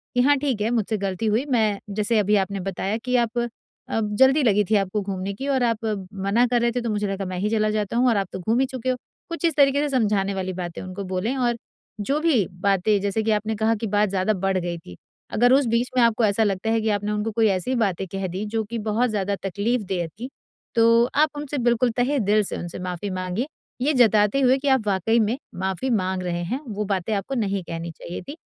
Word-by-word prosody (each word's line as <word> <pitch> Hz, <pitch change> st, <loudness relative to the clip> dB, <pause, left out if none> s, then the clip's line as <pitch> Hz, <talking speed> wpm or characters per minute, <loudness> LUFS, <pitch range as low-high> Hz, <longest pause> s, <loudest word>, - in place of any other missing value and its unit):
कि 245 Hz, -, +4 dB
हाँ 285 Hz, +3 st, +5 dB
ठीक 265 Hz, -7 st, -1 dB
है, 220 Hz, -, +1 dB
मुझसे 220 Hz, -2 st, 0 dB
गलती 195 Hz, +1 st, -3 dB
हुई। 220 Hz, +6 st, +1 dB
मैं 215 Hz, -4 st, +2 dB, 0.2 s
जैसे 215 Hz, +1 st, +1 dB
अभी 210 Hz, +1 st, +2 dB
आपने 195 Hz, 0 st, -3 dB
बताया 195 Hz, +3 st, -2 dB
कि 250 Hz, -, +1 dB
आप 235 Hz, +1 st, -5 dB, 0.5 s
अ, 225 Hz, -, 0 dB
जल्दी 265 Hz, +8 st, +4 dB
लगी 210 Hz, -3 st, +4 dB
थी 220 Hz, -, +3 dB
आपको 200 Hz, +1 st, 0 dB
घूमने 195 Hz, 0 st, -4 dB
की 270 Hz, +8 st, -6 dB
और 265 Hz, -2 st, +1 dB
आप 230 Hz, -1 st, 0 dB, 0.3 s
मना 200 Hz, +5 st, +2 dB
कर 240 Hz, 0 st, +1 dB
रहे 235 Hz, 0 st, +2 dB
थे, 245 Hz, +1 st, -2 dB
तो 235 Hz, -, -2 dB
मुझे 210 Hz, -1 st, -1 dB
लगा 195 Hz, 0 st, -3 dB
मैं 185 Hz, -1 st, -4 dB
ही 210 Hz, +3 st, 0 dB
चला 215 Hz, -1 st, +1 dB
जाता 215 Hz, +1 st, -1 dB
हूँ 250 Hz, +1 st, +4 dB
और 225 Hz, -, +2 dB
आप 195 Hz, -, 0 dB
तो -, -, -4 dB
घूम 225 Hz, +7 st, +1 dB
ही 270 Hz, -, +3 dB
चुके 255 Hz, -1 st, -4 dB
हो। 255 Hz, -, +2 dB, 0.3 s
कुछ 335 Hz, +1 st, -5 dB
इस 330 Hz, -, +2 dB
तरीके 280 Hz, -1 st, +4 dB
से 295 Hz, -, 0 dB
समझाने 200 Hz, -3 st, +1 dB
वाली 185 Hz, -1 st, -3 dB
बातें 175 Hz, -2 st, -5 dB
उनको 185 Hz, +2 st, -6 dB
बोलें 190 Hz, +8 st, -1 dB
और 240 Hz, -2 st, +1 dB, 0.5 s
जो 275 Hz, +8 st, 0 dB
भी 285 Hz, -, +3 dB, 0.2 s
बातें 200 Hz, +1 st, +2 dB
जैसे 205 Hz, +2 st, -1 dB
कि 220 Hz, -, +1 dB
आपने 215 Hz, +1 st, 0 dB
कहा 220 Hz, +2 st, +1 dB
कि 225 Hz, -, -1 dB
बात 205 Hz, 0 st, +2 dB
ज़्यादा 195 Hz, +2 st, +1 dB
बढ़ 190 Hz, -1 st, +2 dB
गई 175 Hz, -1 st, -2 dB
थी। 90 Hz, -, -12 dB, 0.4 s
अगर 245 Hz, +3 st, +4 dB
उस 275 Hz, +1 st, +4 dB
बीच 240 Hz, +2 st, +1 dB
में -, -, +6 dB
आपको 230 Hz, 0 st, +3 dB
ऐसा 210 Hz, +2 st, +2 dB
लगता 200 Hz, +1 st, -1 dB
है 225 Hz, 0 st, +2 dB
कि 220 Hz, -, 0 dB
आपने 205 Hz, 0 st, -1 dB
उनको 210 Hz, +1 st, -1 dB
कोई 220 Hz, 0 st, +3 dB
ऐसी 195 Hz, +7 st, 0 dB
बातें 190 Hz, -1 st, -1 dB
कह 195 Hz, +1 st, -3 dB
दी, 185 Hz, +4 st, -4 dB
जो 220 Hz, +1 st, -1 dB
कि 230 Hz, +3 st, -5 dB
बहुत 235 Hz, +3 st, +2 dB
ज़्यादा 200 Hz, -1 st, -1 dB
तकलीफदेह 200 Hz, -3 st, -1 dB
थी, 230 Hz, -, -8 dB, 0.5 s
तो 230 Hz, +1 st, +5 dB
आप 305 Hz, 0 st, +4 dB
उनसे 290 Hz, 0 st, -4 dB
बिल्कुल 240 Hz, 0 st, +3 dB
तहे 265 Hz, +3 st, +2 dB
दिल 210 Hz, 0 st, +3 dB
से -, -, -3 dB
उनसे 175 Hz, +1 st, -6 dB
माफी 180 Hz, +2 st, -4 dB
माँगे। 185 Hz, +7 st, -2 dB, 0.3 s
ये 295 Hz, +3 st, +2 dB
जताते 220 Hz, 0 st, +4 dB
हुए 260 Hz, +1 st, +4 dB
कि 280 Hz, +1 st, -4 dB
आप 260 Hz, -6 st, +2 dB
वाक़ई 205 Hz, +4 st, +2 dB
में 220 Hz, +4 st, +1 dB, 0.3 s
माफी 190 Hz, +8 st, -2 dB
माँग 185 Hz, 0 st, -2 dB
रहे 175 Hz, -1 st, -2 dB
हैं। 250 Hz, +10 st, -2 dB
वो 210 Hz, -1 st, -3 dB
बातें 195 Hz, +1 st, -1 dB
आपको 200 Hz, +7 st, -3 dB
नहीं 200 Hz, -4 st, -1 dB
कहनी 165 Hz, 0 st, -5 dB
चाहिए 170 Hz, +2 st, -8 dB
थी 305 Hz, -, -7 dB
210 Hz, 240 wpm, -23 LUFS, 195-240 Hz, 0.5 s, में